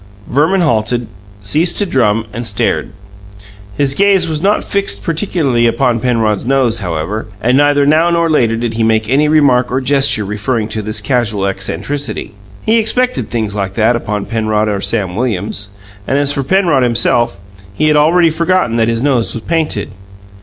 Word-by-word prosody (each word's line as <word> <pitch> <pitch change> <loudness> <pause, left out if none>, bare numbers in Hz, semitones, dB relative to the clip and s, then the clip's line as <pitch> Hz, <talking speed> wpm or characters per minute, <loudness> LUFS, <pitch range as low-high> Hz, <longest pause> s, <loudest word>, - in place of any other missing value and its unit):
Verman 160 +8 +1
halted, 120 -5 0 0.4
ceased 155 - +1
to 205 - +3
drum, 115 - +1
and 115 +1 -4
stared. 100 -2 -1 0.9
His 140 -1 +1
gaze 195 +1 +3
was 155 -2 -3
not 200 +3 +1
fixed 200 0 -1
particularly 155 -8 0
upon 120 0 +1
Penrod's 110 -4 0
nose, 125 -3 +1
however, 90 +4 -4
and 125 +5 +1
neither 145 0 +3
now 155 +4 +3
nor 170 -1 +1
later 120 -8 +1
did 115 -1 -3
he 115 0 -1
make 110 -1 +1
any 140 +5 +2
remark 140 -5 +3
or 130 - 0
gesture 135 -5 +1
referring 105 +2 -2
to 110 0 -4
this 110 0 -4
casual 105 -4 -1
eccentricity. 105 +9 -4 0.3
He 225 +1 +2
expected 250 +3 0
things 110 -4 -2
like 100 -2 -3
that 115 +2 +2
upon 105 -3 -3
Penrod 110 -1 -1
or 100 -2 -2
Sam 95 -6 -1
Williams. 105 -3 -3 0.4
And 135 - +1
as 145 0 +1
for 140 - -1
Penrod 170 -2 +2
himself, 120 -3 +1 0.4
he 155 - +1
had 150 - +3
already 165 +3 +4
forgotten 165 -6 0
that 115 -1 +2
his 115 +1 -1
nose 130 -5 0
was 115 - -6
painted. 160 -11 -2
125 Hz, 170 wpm, -14 LUFS, 110-150 Hz, 0.9 s, already